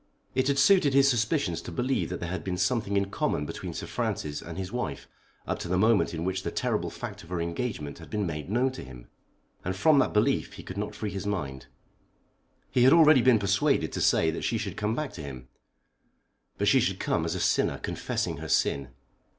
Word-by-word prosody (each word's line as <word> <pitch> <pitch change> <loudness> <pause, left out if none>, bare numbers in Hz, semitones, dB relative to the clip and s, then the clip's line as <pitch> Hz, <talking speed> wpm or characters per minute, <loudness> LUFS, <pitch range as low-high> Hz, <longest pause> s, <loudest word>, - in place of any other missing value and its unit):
It 130 0 +1
had 140 -1 +2
suited 150 -6 +5
his 140 0 +6
suspicions 115 - +1
to - - -8
believe 120 -2 -1
that 90 - -4
there 85 -1 -4
had 95 - -4
been 90 -2 -3
something 100 +1 0
in 100 0 0
common 75 - -1
between - - -6
Sir - - -4
Francis 75 -1 -3
and 85 0 -8
his 95 -1 -4
wife 120 - -4 0.4
up - - -2
to - - -5
the 90 +1 +1
moment 110 +2 +3
in 80 -1 -4
which 95 +1 -1
the - - -3
terrible - - -1
fact - - -7
of 85 - -15
her 90 -1 -2
engagement 85 -3 -3
had 80 -3 -12
been 105 +5 -1
made 75 -1 -5
known 125 +5 +2
to 130 - -8
him; 60 -2 -12 0.5
and 95 +1 -2
from 145 +8 +4
that 130 - +2
belief 105 - +1
he - - -10
could 95 - -8
not 105 +1 -4
free 105 -2 -4
his 100 +1 -4
mind. 70 -10 -3 1.0
He 125 - +2
had 130 +4 +7
already 155 -5 +7
been 125 -1 +5
persuaded 100 - +1
to - - -3
say 80 - +3
that 80 - -5
she 115 - 0
should 105 -4 -4
come 105 +2 -1
back 150 0 -3
to 80 - -7
him; 65 -3 -8 1.1
but - - 0
she - - +6
should - - 0
come 80 - 0
as 80 +2 -2
a - - -2
sinner - - +1
confessing - - -3
her - - -7
sin. 70 -1 +1
100 Hz, 225 wpm, -28 LUFS, 85-125 Hz, 1.1 s, had